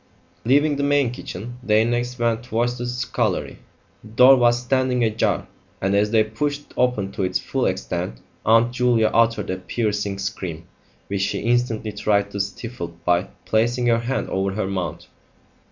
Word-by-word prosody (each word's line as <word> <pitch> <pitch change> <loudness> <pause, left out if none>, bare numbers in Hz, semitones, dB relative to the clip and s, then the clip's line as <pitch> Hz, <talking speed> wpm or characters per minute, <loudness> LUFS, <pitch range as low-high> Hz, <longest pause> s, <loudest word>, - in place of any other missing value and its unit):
Leaving 145 +4 +3
the 140 - -1
main 140 -3 +2
kitchen, 120 +1 -8
they 110 -2 +3
next 120 +1 -1
went 115 -1 0
towards 120 +1 -1
the 120 - -3
scullery. 120 -4 -2 0.4
The - - -12
door 125 +4 +7
was 120 -1 +3
standing 125 0 +1
ajar, 110 -1 0 0.3
and 95 +1 0
as 105 +1 +3
they 110 0 +4
pushed 140 +7 -2
it - - -21
open 115 -6 +1
to 100 - -5
its 95 - +1
full - - -1
extent - - -3 0.2
Aunt 115 +2 +4
Julia 120 -3 +2
uttered 115 -4 +2
a 95 - -2
piercing 105 +1 -2
scream, 90 -4 -5 0.4
which 100 0 -3
she 95 - -1
instantly 115 -2 0
tried 100 -1 0
to 100 - -5
stifle 100 -4 -5
by 90 +1 +2 0.2
placing 120 +3 +1
her 115 -1 +3
hand 125 +3 -2
over 95 0 0
her 110 0 -1
mouth. 90 -5 -4
115 Hz, 170 wpm, -22 LUFS, 100-125 Hz, 0.4 s, door